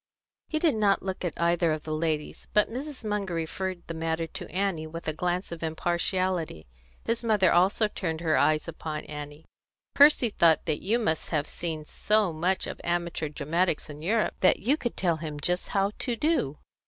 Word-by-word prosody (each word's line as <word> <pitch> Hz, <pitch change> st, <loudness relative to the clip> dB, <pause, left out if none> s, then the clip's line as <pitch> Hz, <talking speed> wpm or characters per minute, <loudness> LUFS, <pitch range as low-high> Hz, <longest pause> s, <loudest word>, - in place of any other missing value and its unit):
He 310 Hz, -, -1 dB
did 315 Hz, -1 st, +3 dB
not 210 Hz, -3 st, +2 dB
look 190 Hz, -1 st, -4 dB
at 175 Hz, -, -3 dB
either 170 Hz, -1 st, +2 dB
of 155 Hz, -1 st, -2 dB
the 155 Hz, -, -4 dB
ladies, 155 Hz, -1 st, -2 dB
but 210 Hz, +1 st, +4 dB
Mrs. 265 Hz, 0 st, -5 dB
Munger 205 Hz, -4 st, -1 dB
referred 175 Hz, +2 st, -3 dB
the 165 Hz, -, -5 dB
matter 165 Hz, 0 st, -1 dB
to -, -, -6 dB
Annie 185 Hz, -4 st, -1 dB
with 165 Hz, +1 st, -8 dB
a 155 Hz, -, 0 dB
glance 180 Hz, +3 st, -2 dB
of 170 Hz, -, -6 dB
impartiality. 170 Hz, -, -1 dB, 0.4 s
His 230 Hz, +1 st, -1 dB
mother 210 Hz, -5 st, +4 dB
also 190 Hz, +5 st, +4 dB
turned 165 Hz, -6 st, -3 dB
her 160 Hz, -2 st, +2 dB
eyes 155 Hz, +1 st, +3 dB
upon 155 Hz, -2 st, -5 dB
Annie. 150 Hz, +1 st, -8 dB, 0.5 s
"Percy 285 Hz, -4 st, +6 dB
thought 165 Hz, -6 st, +3 dB
that 155 Hz, -3 st, -1 dB
you 220 Hz, +5 st, +1 dB
must 160 Hz, -10 st, -1 dB
have 150 Hz, -2 st, 0 dB
seen 160 Hz, -3 st, -4 dB
so 210 Hz, +1 st, +1 dB
much 180 Hz, +4 st, 0 dB
of -, -, -7 dB
amateur 170 Hz, -2 st, -1 dB
dramatics 155 Hz, +2 st, -1 dB
in 145 Hz, +1 st, -10 dB
Europe 215 Hz, +7 st, +1 dB
that 185 Hz, -, +5 dB
you 255 Hz, +8 st, +2 dB
could 240 Hz, -6 st, -4 dB
tell 170 Hz, -3 st, +1 dB
him 155 Hz, -2 st, -5 dB
just 180 Hz, +4 st, -1 dB
how 200 Hz, 0 st, +1 dB
to 245 Hz, -3 st, -1 dB
do." 230 Hz, -, 0 dB
175 Hz, 190 wpm, -27 LUFS, 160-200 Hz, 0.5 s, Percy